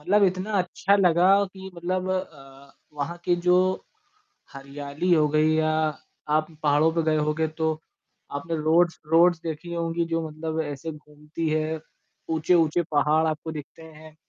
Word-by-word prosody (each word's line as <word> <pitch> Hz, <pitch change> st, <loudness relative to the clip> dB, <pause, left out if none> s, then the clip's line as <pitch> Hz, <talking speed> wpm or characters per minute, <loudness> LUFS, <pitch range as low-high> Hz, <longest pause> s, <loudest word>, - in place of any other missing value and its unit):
मतलब 200 Hz, +7 st, +2 dB
इतना 185 Hz, +3 st, -1 dB
अच्छा 190 Hz, +2 st, +1 dB
लगा 180 Hz, -1 st, +4 dB, 0.2 s
कि 190 Hz, 0 st, -10 dB
मतलब 185 Hz, +2 st, -2 dB
अ, 140 Hz, -7 st, -6 dB, 0.2 s
वहाँ 150 Hz, +4 st, -4 dB
के 175 Hz, -1 st, +2 dB
जो 180 Hz, 0 st, +6 dB, 1.0 s
हरियाली 140 Hz, +5 st, -4 dB
हो 155 Hz, -2 st, +4 dB
गई 155 Hz, +1 st, +4 dB
या 155 Hz, 0 st, +2 dB, 0.7 s
आप 155 Hz, 0 st, -1 dB, 0.2 s
पहाड़ों 150 Hz, +2 st, +3 dB
पे 165 Hz, -, +1 dB
गए 155 Hz, -1 st, +2 dB
होंगे 155 Hz, +1 st, 0 dB
तो 160 Hz, 0 st, -1 dB, 0.7 s
आपने 165 Hz, +3 st, -4 dB
रोड्स-रोड्स 165 Hz, +1 st, +3 dB
देखी 165 Hz, +1 st, -5 dB
होंगी 170 Hz, 0 st, -1 dB
जो 165 Hz, -1 st, -2 dB
मतलब 160 Hz, +1 st, -4 dB
ऐसे 145 Hz, +1 st, -5 dB
घूमती 150 Hz, +1 st, -7 dB
है। 155 Hz, +1 st, -1 dB, 0.5 s
ऊँचे-ऊँचे 160 Hz, +1 st, +2 dB
पहाड़ 150 Hz, +2 st, +3 dB
आपको 155 Hz, +1 st, -3 dB
दिखते 155 Hz, +1 st, -9 dB
हैं। 155 Hz, -1 st, -14 dB
160 Hz, 145 wpm, -25 LUFS, 150-170 Hz, 1.0 s, जो